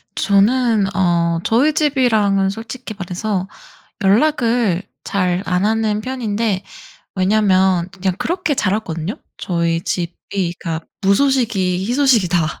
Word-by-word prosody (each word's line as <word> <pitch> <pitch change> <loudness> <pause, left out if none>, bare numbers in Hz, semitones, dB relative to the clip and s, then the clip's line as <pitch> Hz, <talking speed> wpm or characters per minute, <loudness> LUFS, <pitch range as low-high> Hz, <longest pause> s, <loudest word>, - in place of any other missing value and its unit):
저는 210 0 +2
어 170 -3 +1
저희 265 +7 +2
집이랑은 220 -10 +2
솔직히 225 +3 -7
말해서 190 +1 -3 0.6
연락을 230 - +2 0.2
잘 180 -2 0
안 180 +2 0
하는 215 -1 0
편인데 220 -5 -2 0.5
왜냐하면 190 -2 +2
그냥 190 -1 -2
그렇게 350 -3 -1
자랐거든요. 190 - -2 0.2
저희 170 -2 -1
집이 175 +1 -3
가 165 -2 -3 0.2
"무소식이 200 -4 +1
희소식이다." 215 - +2
200 Hz, 250 characters per minute, -18 LUFS, 180-230 Hz, 0.6 s, 저는